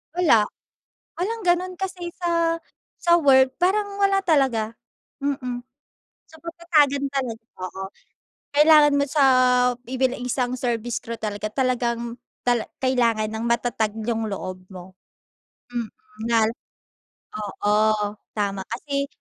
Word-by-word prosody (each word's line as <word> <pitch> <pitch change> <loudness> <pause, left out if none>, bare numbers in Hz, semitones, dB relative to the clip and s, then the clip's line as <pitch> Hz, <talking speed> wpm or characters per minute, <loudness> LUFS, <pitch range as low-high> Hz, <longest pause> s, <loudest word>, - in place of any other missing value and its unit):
Wala. 300 -12 +5 0.8
Walang 445 +6 -2
ganun 360 +1 +2
kasi 365 -2 -4
sa 335 -1 +1 0.4
sa 345 0 +5
work 265 -2 +5
parang 400 +2 +1
wala 390 0 +3
talaga. 255 -9 +2 0.5
Mm. 255 -3 -2 0.7
So - - -19
patatagan 305 -5 +2
talag 255 -5 -3 0.2
oo. 185 +1 -6 0.7
Kailangan 300 -1 +7
mo 280 - +3
sa 285 0 +2 0.6
i 260 - -4
bil 260 -1 +2
isang 250 0 -1
service 240 -1 -2
crew 230 0 -6
talaga, 210 0 -4
talagang 235 -2 -1 0.3
tala 240 -2 +3 0.2
kailangan 235 -4 +2
ng 220 +1 -4
matatag 235 -2 0 0.2
yung 225 -2 -1
loob 185 -1 -5
mo. 185 0 -11 0.8
Mm. 235 -2 -2 0.4
Lal 225 -1 +3 0.9
oo. 210 0 -1 0.6
Tama 200 -2 -1
kasi, 280 +1 -3
255 Hz, 115 wpm, -23 LUFS, 225-315 Hz, 0.9 s, Kailangan